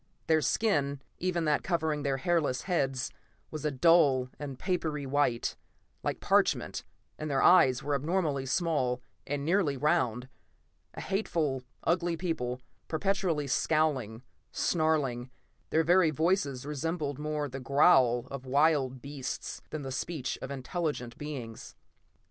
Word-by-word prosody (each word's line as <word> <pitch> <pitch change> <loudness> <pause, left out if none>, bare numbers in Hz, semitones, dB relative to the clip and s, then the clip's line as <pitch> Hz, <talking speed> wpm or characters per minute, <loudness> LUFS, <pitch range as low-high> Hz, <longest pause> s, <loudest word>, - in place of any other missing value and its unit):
Their 160 -1 +3
skin, 145 - +1 0.2
even 175 -2 0
that 150 -1 +2
covering 160 -4 -1
their 140 -2 0
hairless 145 -3 0
heads, 135 -8 -1 0.4
was 155 -2 -5
a - - +3
dull 140 -3 +4
and 140 -3 -6
papery 155 -5 -2
white, 135 -3 0 0.5
like - - -2
parchment, - - +1 0.4
and 155 - -4
their 135 -2 +1
eyes 135 -7 +6
were 145 +1 -1
abnormally 145 -2 0
small, 130 -5 0 0.2
and 145 0 -2
nearly 165 -5 +2
round. 130 -5 +1 0.7
A - - -6
hateful, 165 -9 -1 0.2
ugly 170 -1 +1
people, 130 -8 -2 0.3
perpetually 180 -3 0
scowling, 135 -6 0 0.3
snarling; 145 -7 0 0.4
their 160 - +3
very 175 +1 +5
voices 155 -4 0
resembled 150 -1 -3
more 150 -1 -2
the 135 0 -6
growl 130 -3 +4
of 135 -2 -6
wild 135 -2 +2
beasts 140 -2 -5
than 155 -2 -5
the 135 - -5
speech 135 0 -3
of 130 - -5
intelligent 140 -2 -3
beings. 130 -7 -7
145 Hz, 130 wpm, -30 LUFS, 130-165 Hz, 0.7 s, eyes